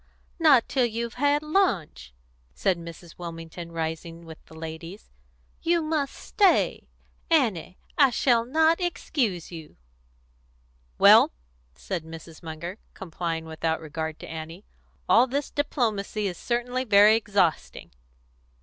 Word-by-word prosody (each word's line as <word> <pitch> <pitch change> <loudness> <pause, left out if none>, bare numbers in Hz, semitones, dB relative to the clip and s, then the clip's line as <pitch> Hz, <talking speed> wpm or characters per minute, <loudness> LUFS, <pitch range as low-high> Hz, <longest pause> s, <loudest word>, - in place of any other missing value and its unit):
"Not 295 -8 +5
till 255 -3 +1
you've 235 +1 -4
had 290 +1 +2
lunch," 230 - 0 0.4
said 190 - +1
Mrs. 170 0 -11
Wilmington, 170 0 -8
rising 165 +1 -5
with 160 -1 -12
the 160 - -15
ladies. 165 - -9 0.5
"You 340 0 +1
must 310 -3 -2
stay. 395 -3 +1 0.4
Annie, 225 - +1 0.2
I 275 -2 +7
shall 240 -1 +2
not 320 +7 +2
excuse 250 - -2
you." 160 -3 -10 1.2
"Well," - - +7 0.4
said 60 - -5
Mrs. 160 0 -11
Munger, 170 +4 -7 0.2
complying 165 -2 -4
without 160 0 -2
regard 160 0 -5
to - - -9
Annie, 165 +4 -8 0.4
"all 240 +3 +5
this 280 +3 -3
diplomacy 220 -7 -1
is 185 -3 -2
certainly 245 +5 -2
very 210 -2 +6
exhausting." 200 -6 -1
195 Hz, 120 wpm, -26 LUFS, 165-255 Hz, 1.2 s, I